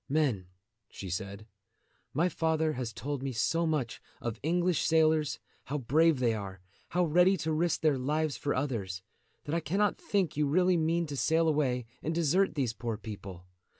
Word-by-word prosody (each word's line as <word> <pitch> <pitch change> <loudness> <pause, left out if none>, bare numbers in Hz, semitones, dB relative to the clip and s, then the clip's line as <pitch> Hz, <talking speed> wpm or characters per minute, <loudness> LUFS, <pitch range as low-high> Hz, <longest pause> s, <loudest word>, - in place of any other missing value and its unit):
"Men," 135 - +1 0.4
she 95 -2 -7
said, 100 +3 -5 0.7
"my 165 +6 +2
father 160 -2 0
has 125 -3 -4
told 140 +5 -4
me 135 0 -2
so 165 +9 +1
much 145 -7 -2 0.2
of 115 -1 -4
English 175 +2 +1
sailors, 155 -2 +3 0.3
how 145 - -2
brave 150 +4 +3
they 120 -3 +2
are, 100 -3 -6 0.3
how 180 +2 +1
ready 180 +4 +4
to 160 -1 -1
risk 170 +1 +1
their 150 -4 +2
lives 150 +2 0
for 145 +4 -2
others, 105 -9 -2 0.4
that 145 - -4
I 170 - +2
cannot 195 +6 0
think 195 -6 0
you 150 0 +1
really 180 +5 +3
mean 165 +1 +1
to 145 -2 -5
sail 160 +4 +2
away 135 -6 +1 0.2
and 160 +1 -2
desert 170 +4 +2
these 130 -6 0
poor 115 -1 -4
people. 100 -4 -8
150 Hz, 175 wpm, -30 LUFS, 120-165 Hz, 0.7 s, ready